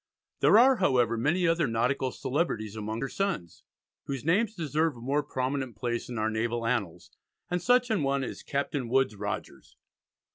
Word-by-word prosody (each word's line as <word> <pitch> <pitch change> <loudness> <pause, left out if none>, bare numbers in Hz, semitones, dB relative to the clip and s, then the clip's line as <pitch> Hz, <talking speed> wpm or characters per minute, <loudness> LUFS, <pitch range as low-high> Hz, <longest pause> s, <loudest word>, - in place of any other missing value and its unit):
There - - +6
are, 255 +2 +6
however, 125 - +2
many 155 +10 +1
other 165 -2 +2
nautical 125 +3 0
celebrities 120 - -2
among 110 +1 -4
her 135 - -1
sons, 130 - -3 0.4
whose 135 -1 -5
names 210 +7 +2
deserve 155 -2 0
a - - -11
more 135 +5 0
prominent 130 -3 -3
place 120 +3 -3
in 120 - -5
our 110 0 0
naval 115 +1 -1
annals, 100 -8 -2 0.4
and 180 0 0
such 245 +2 +3
an 215 - +1
one 140 -1 0
is - - -6
Captain 140 -3 -2
Woodes 130 -4 +2
Rogers. - - -6
135 Hz, 170 wpm, -28 LUFS, 115-165 Hz, 0.4 s, There